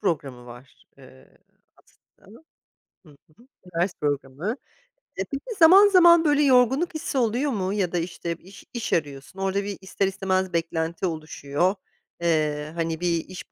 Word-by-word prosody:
programı 135 - -3
var, 120 +2 -14
eee, 65 0 -18 0.4
aslında. 220 +7 -21 0.7
Hı 155 - -17
hı 150 +4 -24 0.4
ders 180 +1 0
programı. 145 - -2 0.6
E, 190 - -1
peki, 275 +7 -6
zaman 380 +5 +8
zaman 345 -3 +6
böyle 295 -1 +3
yorgunluk 265 +6 +3
hissi 310 -3 -3
oluyor 250 +4 +1
mu 195 -3 -2
ya 190 -4 -1
da, 180 - -1
işte, 170 0 -4
iş 195 +3 -15
iş 235 -1 -3
arıyorsun, 140 +1 -3
orada 195 +1 -1
bir 200 -1 -5
ister 190 +1 -1
istemez 190 -1 -1
beklenti 165 +1 -2
oluşuyor. 155 +1 -1 0.5
Eee, 155 -2 0
hani, 165 -1 -2
bir 170 -2 0
iş 185 0 -10
185 Hz, 145 wpm, -24 LUFS, 155-225 Hz, 0.7 s, zaman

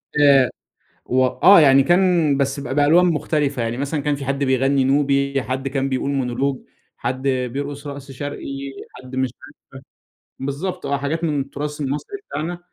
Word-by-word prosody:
آآ 140 -3 +5 0.6
و 130 +1 +1
آه. 190 +9 +6
يعني 135 -2 +6
كان 175 -4 +3
بس 140 0 -1
ب - - -7
بألوان 150 +5 +5
مختلفة. 150 -5 0
يعني 115 +1 -2
مثلًا 140 +3 -2
كان 145 +1 0
في 140 -1 -7
حد 135 +1 -1
بيغنّي 135 +1 +2
نوبي، 140 0 +1
حد 130 +2 -3
كان 135 0 -1
بيقول 135 +1 -1
مونولوج، 135 0 -1 0.4
حد 130 +2 -3
بيرقص 140 +3 -3
رقص 140 -1 -8
شرقي، 145 +2 -6 0.5
حد 130 0 -10
مش 130 0 0
عارف - - -14 0.9
بالضبط 150 +7 -4
آه، 140 - 0
حاجات 155 +4 -2
من 150 -3 0
التُراث 145 +2 -5
المصري 150 - -3
بتاعنا. 170 +3 -4
140 Hz, 160 wpm, -21 LUFS, 135-145 Hz, 0.9 s, آه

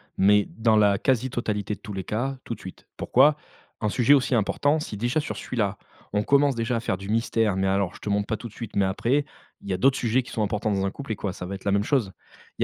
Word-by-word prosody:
mais 105 +1 +4
dans 110 -1 +4
la 100 -2 +4
quasi 130 -1 +1
totalité 105 -4 -2
de - - -8
tous 105 - -9
les 95 -1 -4
cas, 130 +7 -2
tout - - -4
de - - -9
suite. 95 - -11
Pourquoi? 145 +4 +4 0.5
Un 105 - +1
sujet 125 +5 +4
aussi 135 -2 +3
important, 145 +7 +1
si 150 - -6
déjà 120 +8 0
sur 155 - -4
celui-là 105 -5 -2 0.3
on 105 - +2
commence 140 +4 +3
déjà 115 +1 -1
à - - 0
faire 115 - -1
du 95 +1 -8
mystère, 115 -2 +1
mais 95 0 0
alors: 95 -1 0
«Je - - -12
te - - -5
montre 100 0 0
pas 110 - -1
tout 120 - -7
de 110 - -15
suite, 115 0 -8
mais 100 - +3
après!» 120 +9 +1 0.4
il - - -9
y - - +1
a - - 0
d'autres 135 +7 +3
sujets 120 +2 +1
qui 125 - -12
sont 110 - -1
importants 105 +1 -1
dans 95 -1 0
un 100 - -1
couple 135 -2 -5
et - - -5
quoi, 100 -1 -4
ça 90 - -7
va 100 - -4
être 95 - -11
la 100 - +2
même 100 +1 +2
chose? 115 -5 +1 0.5
Il - - +3
110 Hz, 280 wpm, -25 LUFS, 100-125 Hz, 0.5 s, mais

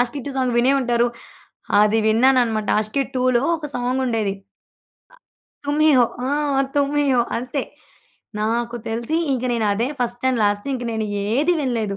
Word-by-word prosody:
'Aashiqui 245 +3 -1
2' 275 - -5
song 255 -2 0
వినే 255 +3 +4
ఉంటారు. 240 -1 +1 0.8
అది 210 +1 +3
విన్నానన్నమాట. 230 -2 +2
'ఆస్కీ 215 +6 0
2'లో 255 -1 +2
ఒక 305 -2 -6
సాంగుండేది. 245 -5 -1 0.8
ఆ - - -20 0.5
'తుమ్‌హిహో' 290 -5 +4 0.2
ఆ! - - -1 0.5
'తుమ్‌హిహో' 280 -3 +2
అంతే. 250 +3 -3 0.8
నాకు 235 +2 -1
తెలిసి 235 +8 -2 0.2
ఇగ 250 - -3
నేను, 220 -2 0
అదే 235 +5 -1
ఫస్ట్ 240 +1 -2
అండ్ 240 -3 -1
లాస్ట్. 205 +3 0
ఇంక 245 - -5
నేను 220 -1 -2 0.3
ఏదీ 310 +6 +3
వినలేదు. 225 -6 -2
245 Hz, 140 wpm, -21 LUFS, 225-265 Hz, 0.8 s, వినే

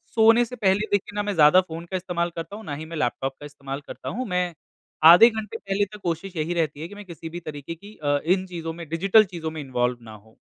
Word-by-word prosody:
सोने 225 +2 +6
से 250 - -8
पहले 205 0 +1
देखिए 205 +2 -1
ना 205 - 0
मैं 205 -1 -2
ज़्यादा 160 +4 +7
फ़ोन 165 -1 -8
का 185 - 0
इस्तेमाल 175 -1 -2
करता 165 +5 -6
हूँ, 220 -1 -10
ना 145 - -4
ही 155 +2 -7
मैं 165 0 -7
लैपटॉप 135 -1 -1
का 145 - -9
इस्तेमाल 140 -1 -7
करता - - -7
हूँ। 250 +2 -4
मैं 180 -2 -1 0.6
आधे 205 +8 +9
घंटे 220 -2 -5
पहले 195 +1 -1
तक 210 - -9
कोशिश 175 +2 -3
यही 160 +2 -1
रहती 155 -3 -1
है 165 - -4
कि 205 - -12
मैं 205 - -9
किसी 165 -2 -8
भी 175 +2 -6
तरीके 155 0 -7
की 205 +5 -14
अ, 145 0 +2
इन 185 +2 +2
चीज़ों 165 -2 -5
में 170 -1 -9
डिजिटल 195 +6 +5
चीज़ों 165 -4 -5
में 155 -1 -6
इन्वॉल्व 125 -2 -1
ना 110 -1 -12
होऊँ। 110 +1 -16
170 Hz, 260 wpm, -24 LUFS, 155-200 Hz, 0.6 s, आधे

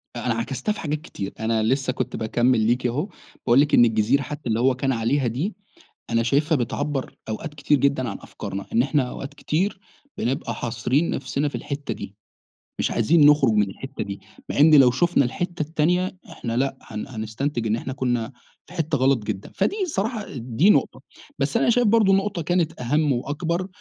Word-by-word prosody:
أنا - - -1
عكَستها 215 - -2
في 210 - -4
حاجات 150 -1 -2
كتير، 100 - -6
أنا 110 0 +1
لسّه 130 +3 +1
كنت 130 -1 -3
باكمل 120 +2 +2
ليكِ 120 +3 +1
أهو، 145 - -2 0.4
باقول 120 +1 +5
لِك 150 +1 0
إن 120 - +7
الجزيرة 115 +4 +2
حتّى 145 -1 -6
اللي 110 0 +1
هو 130 +1 +3
كان 135 +1 0
عليها 125 +3 +1
دي، 145 - -2 0.6
أنا 115 0 +2
شايفها 145 +7 +2
بتعبر 135 +3 -3
أوقات 145 +8 -5
كتير 145 0 +2
جدًا 140 -2 +1
عن 100 - -4
أفكارنا، 100 +1 -7
إن 115 - +4
إحنا 140 +2 +1
أوقات 140 +1 -7
كتير 185 +7 -1 0.4
بنبقى 120 -2 -2
حاصرين 120 +7 0
نفسنا 140 +2 -1
في - - -11
الحتّة 140 0 -4
دي، 100 - -8 0.7
مش - - 0
عايزين 145 +7 +4
نخرج 145 -6 +5
من 105 -2 +2
الحتّة 135 +8 -6
دي، 100 0 -7 0.3
مع - - -2
إن 155 +1 +7
لو 135 -4 +7
شوفنا 170 +1 +2
الحتّة 175 +7 -3
التانية 170 +5 0
إحنا 115 -1 -4
لأ، 135 +1 0
هن 105 -1 -7
هنستنتج 115 +2 -3
إن 110 - +2
إحنا 130 +3 -5
كنّا 120 -3 -1 0.3
في - - -15
حتّة 160 -3 0
غلط 130 -3 +2
جدًا، 105 -2 -5
فدي - - +1
الصراحة 225 - -2
دي 125 - +2
نقطة، - - +2 0.4
بس - - +1
أنا - - +2
شايف 240 0 +3
برضو 210 -2 +4
نقطة 195 -2 0
كانت 165 -2 0
أهم 145 +4 +1
وأكبر 165 +8 -2
135 Hz, 185 wpm, -23 LUFS, 120-155 Hz, 0.7 s, إن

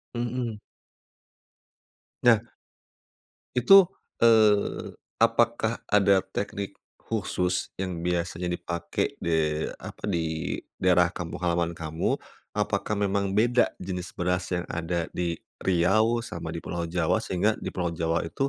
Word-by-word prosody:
Mhm. 120 -2 -2 1.6
Nah. 120 -3 +7 1.1
Itu, 195 +11 +8 0.4
eee, 110 -3 +4 0.2
apakah 115 0 +2
ada 100 -2 +4
teknik 100 +1 -4 0.2
khusus 90 -4 -1
yang 90 -3 -3
biasanya 90 0 -1
dipakai 85 -1 -2
de 80 -2 0
apa? - - -7
di 80 -3 -1 0.2
daerah 90 -1 +4
kampung 85 -2 -5
halaman 85 -1 0
kamu? 80 0 -1 0.4
Apakah 100 +1 0
memang 100 -1 0
beda 120 +3 +4
jenis 90 -1 -5
beras 90 0 0
yang 90 - -2
ada 85 0 -1
di 85 -2 -1 0.2
Riau 110 +6 +2
sama 85 -5 -6
di 80 0 -6
pulau 85 -1 -3
Jawa, 85 -1 +1
sehingga 100 +4 +1
di - - -4
pulau 85 -2 -2
Jawa 85 0 0
itu 135 +11 -1
90 Hz, 115 wpm, -27 LUFS, 85-105 Hz, 1.6 s, Itu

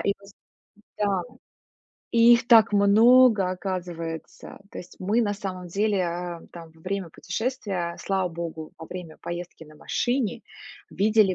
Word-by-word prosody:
их 200 - +1 0.8
да, 200 -3 +1 0.9
и 235 +1 +7
их 235 0 -1
так 225 -3 +7
много 215 0 +5
оказывается. 175 -3 -6
То - - -8
есть 180 - -11
мы 210 +6 +1
на 205 -2 0
самом 185 -3 -6
деле, 200 +1 +1
а, 175 0 -4
там 165 -2 -10
во 160 - -22
время 185 -1 -4
путешествия, 200 -10 -3
слава 190 -2 0
богу, 165 -2 -6
во 160 - -9
время 170 -3 -9
поездки 175 -1 -7
на 155 0 -16
машине 245 - -1 0.5
видели 210 -1 +3
190 Hz, 140 wpm, -25 LUFS, 170-215 Hz, 0.9 s, и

